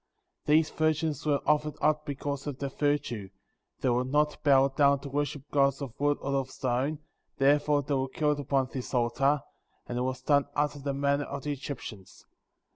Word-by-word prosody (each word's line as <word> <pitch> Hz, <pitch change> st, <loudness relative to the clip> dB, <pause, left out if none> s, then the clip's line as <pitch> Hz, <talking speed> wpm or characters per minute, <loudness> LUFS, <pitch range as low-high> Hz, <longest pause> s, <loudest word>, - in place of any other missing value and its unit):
* -, -, -53 dB
These 155 Hz, +1 st, +4 dB
virgins 155 Hz, -1 st, 0 dB
were 145 Hz, -2 st, +2 dB
offered 150 Hz, 0 st, +2 dB
up 150 Hz, 0 st, +1 dB
because 140 Hz, 0 st, -4 dB
of 140 Hz, -3 st, -4 dB
their 140 Hz, 0 st, -3 dB
virtue; 140 Hz, -9 st, -1 dB, 0.5 s
they 130 Hz, -, +2 dB
would 125 Hz, +1 st, +1 dB
not 150 Hz, +2 st, +1 dB
bow 135 Hz, -2 st, +5 dB
down 140 Hz, +1 st, +3 dB
to 140 Hz, -, -7 dB
worship 145 Hz, 0 st, -2 dB
gods 140 Hz, -1 st, +3 dB
of 135 Hz, -5 st, -6 dB
wood 145 Hz, 0 st, +2 dB
or 140 Hz, -, -2 dB
of 135 Hz, -1 st, -2 dB
stone, 130 Hz, +4 st, -1 dB, 0.4 s
therefore 145 Hz, +1 st, +3 dB
they 140 Hz, +1 st, -2 dB
were 135 Hz, -1 st, 0 dB
killed 150 Hz, +1 st, 0 dB
upon 135 Hz, -2 st, 0 dB
this 130 Hz, 0 st, -4 dB
altar, 135 Hz, +4 st, +2 dB, 0.4 s
and 120 Hz, 0 st, -3 dB
it -, -, 0 dB
was 130 Hz, 0 st, -2 dB
done 145 Hz, 0 st, +3 dB
after 145 Hz, 0 st, 0 dB
the 140 Hz, 0 st, -3 dB
manner 140 Hz, +1 st, +1 dB
of 140 Hz, -1 st, -6 dB
the 150 Hz, -, -2 dB
Egyptians. 125 Hz, -8 st, -8 dB
140 Hz, 190 wpm, -29 LUFS, 135-145 Hz, 0.5 s, bow